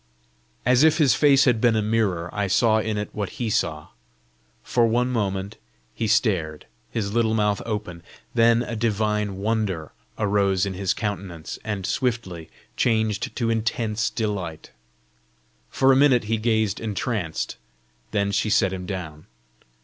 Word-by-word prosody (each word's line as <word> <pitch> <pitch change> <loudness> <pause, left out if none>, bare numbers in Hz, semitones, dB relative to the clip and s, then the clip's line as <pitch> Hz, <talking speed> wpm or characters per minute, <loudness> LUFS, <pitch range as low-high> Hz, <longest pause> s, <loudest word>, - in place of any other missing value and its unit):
As 125 +3 +4
if 160 0 +5
his 145 -8 +4
face 140 +2 +5
had 120 -4 +2
been 120 -2 +4
a 110 - +2
mirror, 105 -6 0
I 105 -1 -1
saw 110 +3 +3
in 110 -1 -2
it 105 - -4
what 105 -2 -4
he 115 -3 -2
saw. 75 -6 -1 0.7
For 120 -2 +2
one 120 +2 +1
moment 100 -4 -2 0.4
he 110 - -2
stared, 95 -9 +1 0.2
his 105 -3 -3
little 110 -1 +2
mouth 105 -1 +1
open; 105 -6 -4 0.3
then 115 0 +4
a 120 - -5
divine 105 -2 0
wonder 100 -6 -2 0.3
arose 100 -2 +1
in 100 - -3
his 95 0 -1
countenance, 95 -6 -5
and 105 -4 -3
swiftly 95 -10 -2 0.3
changed 110 -3 0
to 115 -2 0
intense 110 -1 -1
delight. 95 -8 -4 1.0
For 135 0 +3
a - - +5
minute 135 -3 +4
he 110 +1 -1
gazed 110 -2 0
entranced, 105 -5 -3 0.5
then 100 -1 0
she 105 +2 0
set 95 -2 +2
him 90 -1 -6
down. 80 -6 -6
105 Hz, 150 wpm, -24 LUFS, 95-115 Hz, 1.0 s, if